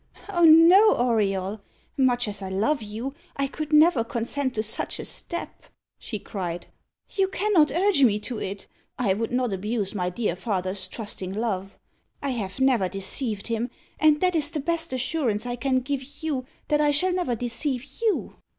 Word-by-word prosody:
"Oh 345 -4 +3
no, 340 +7 +8
Auriol; 205 -4 0 0.3
much 245 -4 +2
as 205 -1 -5
I 190 - -5
love 220 +10 +1
you, 220 +6 -5 0.2
I 275 - +1
could 300 +2 -5
never 300 -4 +5
consent 245 +4 -2
to 215 - 0
such 220 - -2
a - - -5
step," 345 - -4 0.3
she 215 - -5
cried. 180 -4 -5 0.5
"You 390 -1 +1
cannot 380 -5 +3
urge 350 +2 +2
me 215 -5 +5
to 235 0 -4
it. 195 +1 -5 0.3
I 215 -6 +2
would 225 +4 -3
not 250 -3 0
abuse 205 +1 -2
my 180 -3 -1
dear 180 -1 -1
father's 185 -2 -3
trusting 190 -3 -6
love. 195 -3 -3 0.4
I 280 - -2
have 210 -3 -4
never 255 -8 +3
deceived 200 +2 -3
him, 230 +1 -2 0.3
and 305 -1 +5
that 365 -1 +3
is 300 -2 +3
the 310 -1 -3
best 330 +2 -2
assurance 255 -4 -1
I 245 0 -2
can 260 +1 +1
give 280 +3 -5
you 270 -5 -2 0.2
that 300 0 +3
I 295 - +4
shall 360 +6 +3
never 355 -10 0
deceive 245 +3 -1 0.2
you." 445 -3 0
245 Hz, 175 wpm, -25 LUFS, 210-300 Hz, 0.5 s, no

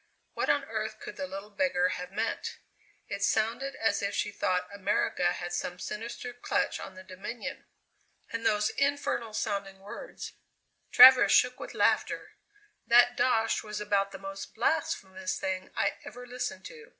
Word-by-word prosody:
What - - -1
on - - +3
earth - - -4
could 420 0 -8
the 280 - -4
little 195 -2 -8
beggar 205 -8 +2
have 180 -1 -5
meant? 220 +3 -3 0.5
It - - -5
sounded 235 +5 0
as 225 - +1
if 200 0 -2
she 205 - -1
thought 180 -2 0
America 195 -3 +1
had 175 0 -5
some 175 0 -3
sinister 230 +5 -6
clutch 245 - -1
on 190 - -8
the 185 - -10
Dominion. 190 +5 -7 0.7
And 230 0 -3
those 210 -1 +2
infernal 275 -5 0
sounding 200 -2 -2
words!" 210 - -8 0.6
Travers 255 0 +9
shook 250 0 +4
with - - -8
laughter. - - +1 0.6
"That 245 +1 +6
'dosh' 225 -3 +2
was 210 -1 -5
about 200 -1 +1
the 195 - -7
most 195 0 -8
blasphemous 190 -10 -1
thing 185 -1 -3
I - - +1
ever 245 +3 -9
listened 250 +1 -5
to. 465 -3 -11
210 Hz, 155 wpm, -29 LUFS, 195-245 Hz, 0.7 s, Travers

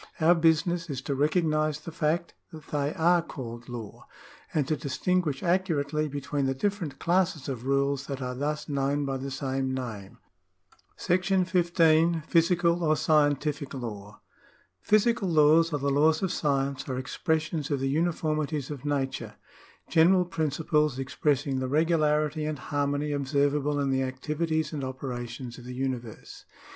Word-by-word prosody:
Our 165 +2 +6
business 165 +1 +2
is 135 -3 -3
to 140 - -2
recognise 155 0 +1
the 165 - -8
fact 160 +2 -1 0.2
that 155 -3 -12
they 145 -1 0
are 175 +2 +4
called 120 -6 -8
law, 115 -4 -8 0.4
and 145 -4 0
to 155 - +1
distinguish 150 +1 -1
accurately 155 -5 0
between 145 0 -2
the 135 - 0
different 175 -3 -2
classes 175 -3 0
of 130 -2 -5
rules 140 0 +1
that 140 -2 -4
are 125 -1 -3
thus 150 +3 -3
known 140 0 0
by 135 -1 -2
the 135 +1 -5
same 135 -1 -2
name. 115 -7 -6 0.8
§ 185 +1 +1
15. 170 -2 +3
Physical 170 0 +3
or 155 -1 +3
Scientific 145 -2 +1
Law. 105 -5 -7 0.6
Physical 215 -1 +2
laws 160 +1 +5
or 150 - 0
the 140 0 -1
laws 155 +4 +3
of 190 - 0
science 140 -5 -1
are 130 - -2
expressions 155 +2 -2
of 140 -2 0
the 135 - -1
uniformities 155 -2 -1
of 140 -3 -7
nature 135 -6 -2 0.3
— - - -28
general 180 +3 +6
principles 150 -3 0
expressing 135 0 0
the 130 - -2
regularity 155 0 +1
and 155 -1 -2
harmony 145 +2 -1
observable 145 +1 +1
in 140 -1 0
the 130 0 +1
activities 155 +5 -2
and 145 -3 -3
operations 125 -2 -6
of 120 - -12
the 125 0 -7
universe. 125 -4 -5
150 Hz, 150 wpm, -27 LUFS, 135-160 Hz, 0.8 s, Our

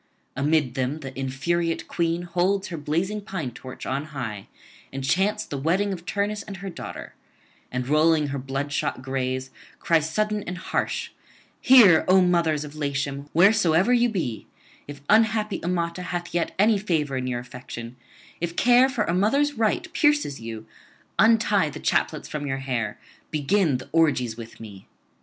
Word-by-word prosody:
Amid 145 -2 +1
them 135 +3 -2
the 135 -2 -8
infuriate 165 +6 -1
queen 170 0 -1
holds 180 +3 0
her 170 - -5
blazing 170 +8 -1
pine 185 - -5
torch 130 +2 -9
on 140 +3 -2
high, 120 -9 -6 0.4
and 135 0 -5
chants 190 +9 +1
the 140 - -5
wedding 190 +7 +1
of 175 -2 -9
Turnus 205 +1 -1
and 195 - -8
her 195 +1 -6
daughter; 170 - -8 0.6
and 125 0 -3
rolling 155 0 +3
her 140 0 -3
bloodshot 135 0 -3
gaze, 130 0 -2 0.3
cries 160 -2 +1
sudden 210 +3 0
and 180 - -4
harsh: - - -2 0.5
'Hear, 225 -11 +7
O 185 +1 +6
mothers 170 -4 +2
of 150 -1 -9
Latium, 140 -1 -3
wheresoever 190 +2 +4
you 240 0 +4
be; 160 - -3 0.4
if 140 -1 -9
unhappy 215 -1 +2
Amata 170 0 -1
hath 175 -1 -4
yet 175 -1 -1
any 210 +1 +4
favour 155 -8 -1
in 130 0 -2
your 120 -1 -2
affection, 120 -1 -9 0.4
if 170 0 -3
care 250 +4 +5
for 240 -5 0
a 170 - -1
mother's 275 +11 +2
right 225 - 0
pierces 295 - +2
you, 110 -1 -7 0.5
untie 210 -5 +4
the 150 - -8
chaplets 155 - 0
from 145 -1 -4
your 135 -1 -1
hair, 125 -5 -3 0.3
begin 155 0 +1
the 130 - -11
orgies 145 -8 +2
with 115 -1 -10
me.' 100 -4 -11
160 Hz, 160 wpm, -24 LUFS, 135-195 Hz, 0.6 s, Hear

